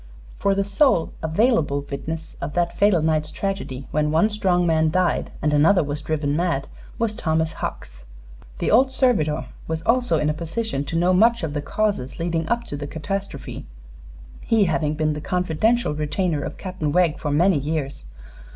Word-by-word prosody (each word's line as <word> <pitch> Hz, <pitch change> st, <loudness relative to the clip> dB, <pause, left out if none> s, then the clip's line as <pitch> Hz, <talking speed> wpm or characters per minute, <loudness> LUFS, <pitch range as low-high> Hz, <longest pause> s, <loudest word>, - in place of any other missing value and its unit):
For 200 Hz, 0 st, +2 dB
the 200 Hz, -, +1 dB
sole 200 Hz, -, +2 dB
available 160 Hz, -, +1 dB
witness 160 Hz, +3 st, -5 dB
of 145 Hz, -, -4 dB
that 175 Hz, 0 st, 0 dB
fatal 200 Hz, -6 st, +3 dB
night's 155 Hz, -1 st, +1 dB
tragedy, 175 Hz, -9 st, -4 dB
when 150 Hz, 0 st, +1 dB
one 165 Hz, +8 st, +3 dB
strong 185 Hz, -4 st, +1 dB
man 160 Hz, -1 st, +3 dB
died 180 Hz, +2 st, +1 dB
and 150 Hz, 0 st, +2 dB
another 165 Hz, +5 st, +5 dB
was 145 Hz, 0 st, -4 dB
driven 145 Hz, -2 st, -1 dB
mad, 165 Hz, -5 st, 0 dB, 0.3 s
was 230 Hz, -2 st, 0 dB
Thomas 160 Hz, -4 st, 0 dB
Hucks. -, -, -6 dB, 0.5 s
The -, -, -1 dB
old 260 Hz, +4 st, +5 dB
servitor 220 Hz, -, +1 dB, 0.2 s
was 160 Hz, 0 st, -3 dB
also 240 Hz, -5 st, +2 dB
in 150 Hz, -, 0 dB
a 150 Hz, -, +1 dB
position 165 Hz, 0 st, -3 dB
to 150 Hz, -, -5 dB
know 175 Hz, +2 st, +3 dB
much 230 Hz, +3 st, +4 dB
of 155 Hz, -3 st, -2 dB
the 145 Hz, -, -2 dB
causes 200 Hz, -8 st, -1 dB
leading 165 Hz, -1 st, -2 dB
up 235 Hz, 0 st, +1 dB
to 145 Hz, -, -6 dB
the 145 Hz, 0 st, -5 dB
catastrophe, 195 Hz, +7 st, -5 dB, 0.7 s
he 225 Hz, -2 st, +2 dB
having 155 Hz, -4 st, 0 dB
been 155 Hz, 0 st, 0 dB
the 150 Hz, -, -5 dB
confidential 180 Hz, +4 st, +1 dB
retainer 150 Hz, +1 st, -1 dB
of -, -, -6 dB
Captain 185 Hz, -6 st, -3 dB
Wegg 170 Hz, -1 st, +2 dB
for 150 Hz, -, -3 dB
many 165 Hz, +3 st, +3 dB
years. 140 Hz, -, -3 dB
160 Hz, 175 wpm, -23 LUFS, 150-195 Hz, 0.7 s, another